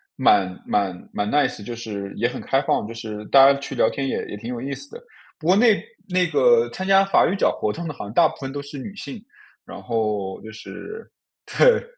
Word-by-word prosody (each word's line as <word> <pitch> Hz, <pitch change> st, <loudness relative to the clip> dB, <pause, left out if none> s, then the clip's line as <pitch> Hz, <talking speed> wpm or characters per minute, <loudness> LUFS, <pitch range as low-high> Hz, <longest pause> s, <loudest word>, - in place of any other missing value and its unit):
蛮 95 Hz, -2 st, +3 dB
蛮 95 Hz, -3 st, -2 dB
蛮 105 Hz, 0 st, -1 dB
Nice， 145 Hz, -6 st, +1 dB
就 120 Hz, +3 st, -6 dB
是 100 Hz, -4 st, -6 dB
也 120 Hz, -, +2 dB
很 125 Hz, -, -6 dB
开 135 Hz, -, +1 dB
放， 135 Hz, -, 0 dB
就 115 Hz, -, -7 dB
是 110 Hz, -2 st, -7 dB
大 135 Hz, +4 st, +7 dB
家 140 Hz, -, 0 dB
去 140 Hz, -, -6 dB
聊 -, -, +3 dB
天 135 Hz, -1 st, -3 dB
也 -, -, -2 dB
也 105 Hz, -, -7 dB
挺 115 Hz, +3 st, -8 dB
有 120 Hz, -, -5 dB
意 140 Hz, +2 st, -4 dB
思 140 Hz, +1 st, -9 dB
的。 -, -, -10 dB, 0.4 s
不 155 Hz, -, -6 dB
过 185 Hz, -, +6 dB
那 220 Hz, 0 st, +4 dB, 0.3 s
那 180 Hz, -1 st, +2 dB
个 475 Hz, -, +4 dB
参 190 Hz, -, -5 dB
加 195 Hz, 0 st, +6 dB
法 195 Hz, -, +4 dB
语 190 Hz, -, 0 dB
角 200 Hz, -, +2 dB
活 105 Hz, -, 0 dB
动 170 Hz, +8 st, -6 dB
的 155 Hz, -, -4 dB
好 -, -, -8 dB
像 100 Hz, -, -8 dB
大 165 Hz, +5 st, +5 dB
部 -, -, -8 dB
分 135 Hz, -1 st, -6 dB
都 145 Hz, +1 st, -5 dB
是 140 Hz, 0 st, -9 dB
女 195 Hz, +10 st, -8 dB
性， 215 Hz, +1 st, -8 dB, 0.4 s
然 -, -, -9 dB
后 105 Hz, -5 st, -2 dB
就 110 Hz, -, -10 dB
是 435 Hz, -, -10 dB, 0.4 s
对， -, -, +5 dB
135 Hz, 270 characters per minute, -22 LUFS, 105-180 Hz, 0.4 s, 大